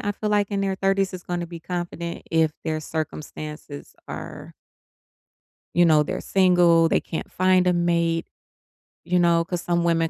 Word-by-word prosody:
I 205 - -1
feel 210 +1 -3
like, 205 -1 +1
in 200 -1 -1
their 195 -1 0
30s 195 0 0
is 180 - -7
gonna 175 -1 -3
be 170 -1 -9
confident 175 -1 -5
if 160 -1 +3
their 155 -1 -1
circumstances 150 -1 -6
are - - -8 1.2
you 175 0 +5
know, 155 -2 +5
they're 185 +4 -3
single, 175 -3 +4
they - - +2
can't 160 - -6
find 185 0 +3
a 180 - +4
mate. 170 -1 +1 0.8
You 180 +2 +1
know, 170 -1 +4
'cause 175 -1 -3
some 175 -1 0
women 165 -1 +2
175 Hz, 165 wpm, -24 LUFS, 165-185 Hz, 1.2 s, you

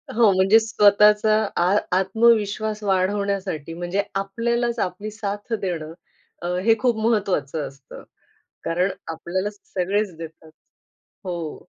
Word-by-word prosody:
हो, 225 -3 +5
म्हणजे 190 +4 +5
स्वतःचा 210 0 +4 0.3
आ 180 +3 +3 0.2
आत्मविश्वास 215 +1 +2
वाढवण्यासाठी 190 -4 -1
म्हणजे, 175 +4 -2
आपल्यालाच 235 +4 -1
आपली 195 +3 -3
साथ 205 +1 -5
देणं, 165 -4 -4 0.5
अ, 175 - -4 0.2
हे 225 -1 +5
खूप 245 -2 +1
महत्वाचं 180 -10 0
असतं. 135 0 -13 0.6
कारण 180 +3 +1 0.2
आपल्याला 180 +5 -3
सगळेच 200 -1 -2
देतात. 160 -1 -10 0.7
हो. 170 -4 -5
200 Hz, 105 wpm, -23 LUFS, 175-215 Hz, 0.7 s, हो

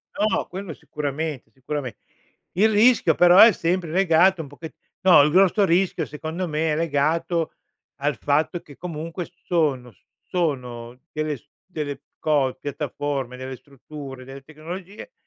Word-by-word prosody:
No, 210 0 +1
quello 185 -4 -7
sicuramente, 150 -3 -4
sicurame 130 0 -5 0.6
il 210 +5 +4
rischio, 220 -6 +4
però, 175 +1 +6
è 225 - +10
sempre 175 -1 -1
legato 180 0 +4
un - - -10
poche 150 +3 -10 0.3
no, 185 -5 +7
il 150 - +2
grosso 195 +3 +4
rischio, 180 +1 +1
secondo 160 +4 -5
me, 155 0 0
è - - 0
legato 165 +2 0 0.5
al 145 +1 +1
fatto 155 +4 0
che 145 - -15
comunque 165 +1 -5 0.2
sono 140 -8 0
s 95 - -32 0.2
sono 125 -8 -3
delle 155 -1 -2
s - - -26 0.2
delle 150 -6 -5 0.2
co 145 -4 +1
piattaforme, 140 -2 -4
delle 130 0 -6
strutture, 140 0 -11
delle 135 +1 -10
tecnologie 175 - -9
155 Hz, 140 wpm, -23 LUFS, 140-175 Hz, 0.6 s, è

